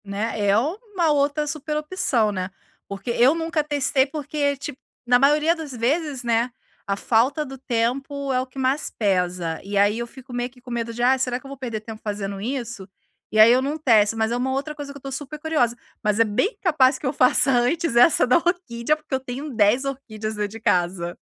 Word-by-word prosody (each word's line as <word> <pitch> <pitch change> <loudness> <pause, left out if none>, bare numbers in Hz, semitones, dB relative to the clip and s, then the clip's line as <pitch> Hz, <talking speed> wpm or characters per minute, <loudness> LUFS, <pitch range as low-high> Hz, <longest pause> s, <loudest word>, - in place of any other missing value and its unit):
Né, 205 +1 -2
é 200 - +4
uma 350 - 0
outra 290 +1 +1
super 300 0 -3
opção, 300 - 0
né, 185 -2 -3 0.4
porque 200 +4 -5
eu 245 +5 +4
nunca 325 -1 -1
testei, 285 -2 +1
porque 285 0 -2
ti 285 +1 -6 0.3
na 245 0 +4
maioria 300 +4 +4
das 320 -4 -7
vezes, 275 +3 -1
né, 235 +1 +1 0.4
a 200 - 0
falta 250 +9 +1
do 270 -1 -8
tempo 270 +3 -2
é 255 - +2
o 260 - -6
que 255 - -17
mas 265 +2 0
pesa, 180 -5 -1
e 200 +1 -3
aí 205 +3 +3
eu 235 - -3
fico 260 +1 -13
meio 245 0 -2
que 250 0 -21
com 245 0 -11
medo 235 -1 -2
de: 240 +1 -3
"Ah, 255 +2 +5
será 250 -1 -1
que 275 - -22
eu - - -9
vou 275 - -8
perder 235 -5 -4
tempo 220 0 -9
fazendo 200 -2 -4
isso?". 230 -5 -5 0.4
E 215 - +1
aí 220 +2 +9
eu 255 +1 +4
não 285 +3 -2
testo, 225 -7 +3
mas 220 0 0
é - - 0
uma 260 +2 -1
outra 280 +3 -3
coisa 290 -1 -7
que 280 - -10
eu - - -12
estou 275 0 -7
super 290 +3 -6
curiosa, 300 -7 +1 0.3
mas 210 0 +1
é 230 - +6
bem 220 - 0
capaz 295 -7 +3
que - - -9
eu 260 - 0
faça 260 0 +4
antes 260 +4 +1
essa 245 +6 +6
da 250 - +5
orquídea, 310 -6 0
porque 305 -2 -11
eu 265 - +2
tenho 265 +4 -6
10 220 +4 +3
orquídeas 220 -6 -5
dentro 210 -1 -2
de 225 +2 -9
casa. 175 -4 0
255 Hz, 220 wpm, -23 LUFS, 220-290 Hz, 0.4 s, aí